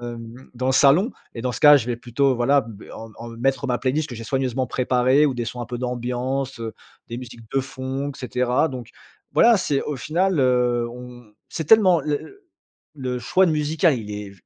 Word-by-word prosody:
hem 120 Hz, -1 st, -8 dB, 0.2 s
dans 130 Hz, +1 st, -3 dB
le 130 Hz, -, +2 dB
salon 150 Hz, -, +4 dB, 0.2 s
et 115 Hz, -, -6 dB
dans 125 Hz, 0 st, -1 dB
ce 105 Hz, -, -6 dB
cas, 150 Hz, 0 st, +9 dB
je 125 Hz, -4 st, -1 dB
vais 120 Hz, -, -1 dB
plutôt, 130 Hz, +3 st, 0 dB
voilà, 135 Hz, +4 st, +3 dB
b 110 Hz, -2 st, -12 dB
en 115 Hz, -1 st, -10 dB
en 115 Hz, -, -8 dB
mettre 135 Hz, +4 st, -1 dB
ma 125 Hz, -1 st, 0 dB
playlist 145 Hz, +4 st, -1 dB
que 120 Hz, -, -7 dB
j'ai 115 Hz, -, -8 dB
soigneusement 130 Hz, 0 st, -1 dB
préparée, 130 Hz, +3 st, +2 dB
ou 135 Hz, -, -1 dB
des 120 Hz, -, -3 dB
sons 120 Hz, +2 st, -6 dB
un 120 Hz, -, -5 dB
peu 120 Hz, +1 st, -5 dB
d'ambiance, 125 Hz, +2 st, -3 dB
heu, 115 Hz, -1 st, -6 dB, 0.3 s
des 120 Hz, -, -5 dB
musiques 115 Hz, -3 st, -11 dB
de 135 Hz, -, +3 dB
fond, 130 Hz, +2 st, -5 dB
et 140 Hz, -, -12 dB
cetera. 125 Hz, +2 st, 0 dB
Donc 125 Hz, -4 st, -7 dB, 0.4 s
voilà, 235 Hz, -1 st, +5 dB
c'est 145 Hz, -7 st, 0 dB
au 150 Hz, -, -4 dB
final, 165 Hz, +6 st, 0 dB
heu, 125 Hz, -2 st, +2 dB
on 120 Hz, -2 st, -12 dB, 0.2 s
c'est 160 Hz, -, -4 dB
tellement 185 Hz, -1 st, +5 dB
le 150 Hz, -1 st, -1 dB
le 400 Hz, +1 st, -14 dB, 0.5 s
le 125 Hz, -2 st, -3 dB
choix 185 Hz, +10 st, +3 dB
de 160 Hz, -, +1 dB
musical, 155 Hz, 0 st, +1 dB
il 105 Hz, -2 st, -7 dB
est 105 Hz, -1 st, -6 dB
125 Hz, 215 wpm, -22 LUFS, 120-140 Hz, 0.5 s, cas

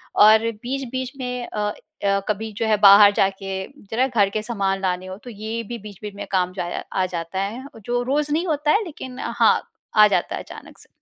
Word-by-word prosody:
और 220 Hz, +2 st, +6 dB
बीच-बीच 260 Hz, 0 st, -3 dB
में 250 Hz, -1 st, -4 dB
अ, 210 Hz, -, -5 dB, 0.5 s
अ, 200 Hz, 0 st, +3 dB
कभी 215 Hz, +1 st, -2 dB
जो 225 Hz, -, 0 dB
है 215 Hz, -1 st, +3 dB
बाहर 200 Hz, 0 st, +9 dB
जाके 195 Hz, -1 st, -1 dB, 0.3 s
ज़रा 250 Hz, +4 st, +2 dB
घर 215 Hz, -6 st, +2 dB
के 215 Hz, +2 st, -2 dB
सामान 195 Hz, -4 st, -1 dB
लाने 185 Hz, -1 st, -1 dB
हो, 185 Hz, 0 st, -7 dB
तो 245 Hz, -, -12 dB
ये 220 Hz, +1 st, -5 dB
भी 240 Hz, -, -4 dB
बीच-बीच 205 Hz, 0 st, -9 dB
में -, -, -6 dB
काम 185 Hz, -1 st, +1 dB
जाया 175 Hz, -2 st, -4 dB, 0.2 s
आ 185 Hz, -, +2 dB
जाता 170 Hz, +1 st, -4 dB
है, 225 Hz, +7 st, -4 dB, 0.2 s
जो 245 Hz, 0 st, 0 dB
रोज़ 290 Hz, +3 st, 0 dB
नहीं 330 Hz, +3 st, +1 dB
होता 300 Hz, -1 st, +1 dB
है, 425 Hz, -, +3 dB
लेकिन 260 Hz, -6 st, -8 dB
हाँ, 235 Hz, -1 st, +3 dB, 0.3 s
आ 215 Hz, -1 st, +8 dB
जाता 205 Hz, -, 0 dB
है -, -, -5 dB
अचानक -, -, -12 dB
से। -, -, -16 dB
215 Hz, 205 wpm, -22 LUFS, 195-250 Hz, 0.5 s, बाहर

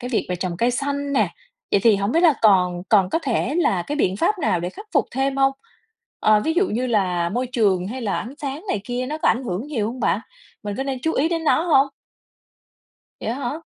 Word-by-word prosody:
cái 245 Hz, 0 st, -5 dB
việc 230 Hz, -, 0 dB
về 180 Hz, -, -2 dB
trồng 175 Hz, -1 st, -3 dB
cây 235 Hz, +5 st, +2 dB
xanh 280 Hz, +2 st, -2 dB
nè, 275 Hz, -, +2 dB, 0.4 s
vậy 200 Hz, -, +4 dB
thì 220 Hz, -3 st, +6 dB
hổng 200 Hz, +3 st, -1 dB
biết 335 Hz, -, +3 dB
là 320 Hz, -5 st, +6 dB
còn 180 Hz, -4 st, +4 dB
còn 195 Hz, -4 st, +4 dB
có -, -, +1 dB
thể 265 Hz, 0 st, -1 dB
là 200 Hz, -, +2 dB
cái 295 Hz, +10 st, -4 dB
biện 190 Hz, -9 st, +1 dB
pháp 370 Hz, -, +1 dB
nào 180 Hz, -, +1 dB
để 175 Hz, -, -2 dB
khắc 420 Hz, -, -11 dB
phục -, -, +3 dB
thêm 270 Hz, +1 st, -1 dB
hông? 270 Hz, 0 st, +3 dB, 0.7 s
Ờ, 215 Hz, 0 st, +4 dB
ví 320 Hz, +9 st, 0 dB
dụ 380 Hz, +3 st, +3 dB
như 245 Hz, +4 st, -1 dB
là 180 Hz, -7 st, +1 dB
môi 245 Hz, +6 st, -2 dB
trường 200 Hz, -7 st, +1 dB
hay 255 Hz, +2 st, -5 dB
là 205 Hz, -, -1 dB
ánh 245 Hz, +5 st, -6 dB
sáng 285 Hz, +4 st, -5 dB
này 210 Hz, -, 0 dB
kia 245 Hz, +1 st, -3 dB
nó 305 Hz, +3 st, -4 dB
có -, -, +2 dB
ảnh 255 Hz, +3 st, +1 dB
hưởng 205 Hz, +3 st, -3 dB
nhiều 245 Hz, -9 st, -2 dB
hông 245 Hz, +3 st, -5 dB
bạn? 210 Hz, -1 st, +1 dB, 0.4 s
Mình 205 Hz, -1 st, -4 dB
có -, -, -1 dB
nên 270 Hz, -1 st, -3 dB
chú 320 Hz, -, +1 dB
ý 305 Hz, +5 st, +2 dB
đến 330 Hz, -1 st, -2 dB
nó 315 Hz, -, +3 dB
hông? 285 Hz, -5 st, +4 dB, 1.3 s
Vậy -, -, -4 dB
á 235 Hz, -, -1 dB
hả? 285 Hz, +4 st, -4 dB
245 Hz, 250 wpm, -22 LUFS, 200-280 Hz, 1.3 s, thì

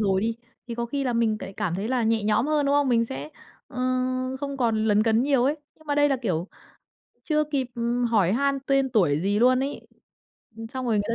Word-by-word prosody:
rồi 195 Hz, -3 st, +2 dB
đi, 225 Hz, +1 st, -1 dB, 0.3 s
thì 235 Hz, -, -5 dB
có 235 Hz, 0 st, -3 dB
khi 275 Hz, +3 st, -2 dB
là 250 Hz, -, 0 dB
mình 230 Hz, -2 st, +1 dB
tại 195 Hz, -, -8 dB
cảm 195 Hz, -4 st, -2 dB
thấy 200 Hz, +4 st, -3 dB
là 255 Hz, -1 st, +1 dB
nhẹ 225 Hz, -1 st, +1 dB
nhõm 215 Hz, +4 st, +2 dB
hơn, 300 Hz, -2 st, +1 dB
đúng 280 Hz, -, +2 dB
không? 285 Hz, -1 st, +3 dB
Mình 230 Hz, -2 st, +3 dB
sẽ, 145 Hz, -8 st, -6 dB, 0.4 s
ờ, -, -, -13 dB, 0.6 s
không 280 Hz, -1 st, -4 dB
còn 225 Hz, -4 st, +1 dB
lấn 210 Hz, -1 st, +3 dB
cấn 225 Hz, +1 st, +2 dB
nhiều 270 Hz, -2 st, +2 dB
ấy, 290 Hz, +4 st, +1 dB, 0.2 s
nhưng 315 Hz, -, -22 dB
mà 290 Hz, -, 0 dB
đây 290 Hz, 0 st, +4 dB
là, 275 Hz, -, +1 dB
kiểu, 185 Hz, -8 st, -2 dB, 0.8 s
chưa 305 Hz, -1 st, +1 dB
kịp, 280 Hz, -3 st, -2 dB
ừm, 240 Hz, +1 st, -1 dB
hỏi 210 Hz, -6 st, +2 dB
han 275 Hz, +4 st, +1 dB
tên 275 Hz, -1 st, +2 dB
tuổi 165 Hz, -10 st, +2 dB
gì 200 Hz, +3 st, +1 dB
luôn 255 Hz, +2 st, +4 dB
ấy. 280 Hz, +1 st, -4 dB, 0.8 s
Ừm, 225 Hz, -, -7 dB
xong 260 Hz, +1 st, -5 dB
rồi 230 Hz, -, +1 dB
người 205 Hz, -, +2 dB
ta 230 Hz, -, 0 dB
235 Hz, 240 wpm, -25 LUFS, 215-275 Hz, 0.8 s, đây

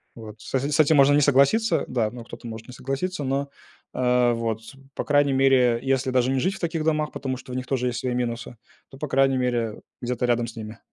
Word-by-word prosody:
Вот, 110 Hz, -2 st, -10 dB
с -, -, -11 dB
с 140 Hz, +4 st, 0 dB
этим 155 Hz, 0 st, +5 dB
можно 140 Hz, 0 st, +6 dB
не 145 Hz, -, +4 dB
согласиться, 140 Hz, -, +3 dB
да, 115 Hz, -4 st, 0 dB
ну 120 Hz, +1 st, -9 dB
кто-то 120 Hz, -, -10 dB
может 110 Hz, 0 st, -8 dB
не 125 Hz, -, -10 dB
согласиться, 140 Hz, +7 st, -3 dB
но, 140 Hz, +1 st, -1 dB, 0.4 s
э, 125 Hz, -1 st, +2 dB
вот, 115 Hz, -1 st, -2 dB, 0.3 s
по -, -, -2 dB
крайней 145 Hz, -1 st, +3 dB
мере, 130 Hz, -3 st, +4 dB
если 135 Hz, -1 st, 0 dB
даже 125 Hz, 0 st, +2 dB
не 135 Hz, -, +1 dB
жить 185 Hz, +8 st, 0 dB
в -, -, -10 dB
таких 165 Hz, -2 st, -1 dB
домах, 155 Hz, -1 st, 0 dB
потому 130 Hz, -1 st, -4 dB
что 130 Hz, -, -11 dB
у -, -, -5 dB
них 130 Hz, 0 st, -3 dB
тоже 125 Hz, -2 st, 0 dB
есть 120 Hz, -2 st, -2 dB
свои 125 Hz, -1 st, -2 dB
минусы, 120 Hz, -1 st, -3 dB, 0.3 s
то 135 Hz, -, -13 dB
по 150 Hz, -, -4 dB
крайней 135 Hz, 0 st, +3 dB
мере 120 Hz, -3 st, -1 dB, 0.2 s
где-то 125 Hz, 0 st, -1 dB
рядом 120 Hz, -1 st, +1 dB
с 115 Hz, -, -10 dB
ними. 110 Hz, 0 st, -8 dB
130 Hz, 230 wpm, -24 LUFS, 120-140 Hz, 0.4 s, можно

